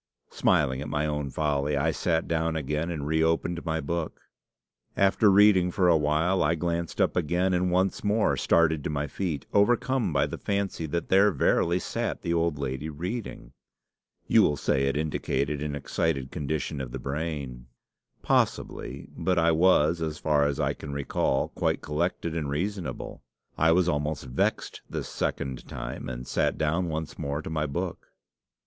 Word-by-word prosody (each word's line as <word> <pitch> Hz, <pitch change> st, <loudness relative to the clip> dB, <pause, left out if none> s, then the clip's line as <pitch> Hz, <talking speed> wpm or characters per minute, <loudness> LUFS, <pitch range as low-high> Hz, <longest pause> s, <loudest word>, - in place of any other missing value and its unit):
Smiling 65 Hz, -3 st, +2 dB
at 75 Hz, -, -5 dB
my 75 Hz, 0 st, 0 dB
own 75 Hz, -2 st, -2 dB
folly, 75 Hz, 0 st, 0 dB
I 80 Hz, +4 st, +2 dB
sat 80 Hz, 0 st, 0 dB
down 80 Hz, 0 st, 0 dB
again, 75 Hz, +2 st, -2 dB
and 80 Hz, -5 st, -4 dB
reopened 80 Hz, +2 st, +1 dB
my 80 Hz, -1 st, -1 dB
book. 85 Hz, +2 st, -3 dB, 0.8 s
After 100 Hz, +2 st, +4 dB
reading 100 Hz, -2 st, +6 dB
for 90 Hz, 0 st, +2 dB
a 85 Hz, -, +6 dB
while, 80 Hz, +5 st, +2 dB
I 80 Hz, +3 st, +2 dB
glanced 85 Hz, 0 st, -2 dB
up -, -, +2 dB
again, 90 Hz, +3 st, +1 dB
and 90 Hz, 0 st, +1 dB
once 95 Hz, +1 st, +1 dB
more 105 Hz, +1 st, +2 dB
started 80 Hz, -3 st, +2 dB
to -, -, -2 dB
my 75 Hz, -1 st, -1 dB
feet, 75 Hz, 0 st, -3 dB
overcome 120 Hz, +1 st, +2 dB
by 70 Hz, -2 st, +2 dB
the -, -, -6 dB
fancy 100 Hz, -5 st, -2 dB
that 85 Hz, +3 st, -3 dB
there 100 Hz, +2 st, +6 dB
verily 85 Hz, +3 st, +2 dB
sat 90 Hz, -, -3 dB
the 85 Hz, -, 0 dB
old 85 Hz, -2 st, +1 dB
lady 70 Hz, +2 st, -3 dB
reading. 85 Hz, -, -6 dB, 0.7 s
You -, -, +5 dB
will 75 Hz, -, +2 dB
say 70 Hz, 0 st, +1 dB
it 70 Hz, -, 0 dB
indicated 75 Hz, -1 st, -1 dB
an 75 Hz, -1 st, -3 dB
excited 70 Hz, -1 st, -2 dB
condition 75 Hz, -1 st, -3 dB
of 65 Hz, -2 st, -6 dB
the -, -, -3 dB
brain. 70 Hz, -4 st, -4 dB, 0.6 s
Possibly; -, -, -1 dB
but 90 Hz, -1 st, 0 dB
I 85 Hz, 0 st, +4 dB
was, 85 Hz, -1 st, +4 dB
as 80 Hz, -1 st, -2 dB
far 75 Hz, -2 st, +2 dB
as 70 Hz, -, -2 dB
I -, -, +1 dB
can 70 Hz, -, -8 dB
recall, 70 Hz, -1 st, 0 dB
quite -, -, -1 dB
collected 85 Hz, +1 st, -2 dB
and 75 Hz, -4 st, -2 dB
reasonable. 85 Hz, -2 st, -4 dB, 0.3 s
I 80 Hz, +1 st, +3 dB
was 90 Hz, +1 st, +3 dB
almost 75 Hz, -3 st, -1 dB
vexed 65 Hz, 0 st, -1 dB
this -, -, -4 dB
second 65 Hz, -2 st, -3 dB
time, -, -, -6 dB
and 60 Hz, 0 st, -6 dB
sat -, -, 0 dB
down 85 Hz, +3 st, 0 dB
once 80 Hz, 0 st, -5 dB
more 70 Hz, +2 st, -3 dB
to -, -, -6 dB
my 75 Hz, -1 st, -1 dB
book. 85 Hz, +5 st, -4 dB
80 Hz, 170 wpm, -27 LUFS, 75-85 Hz, 0.8 s, reading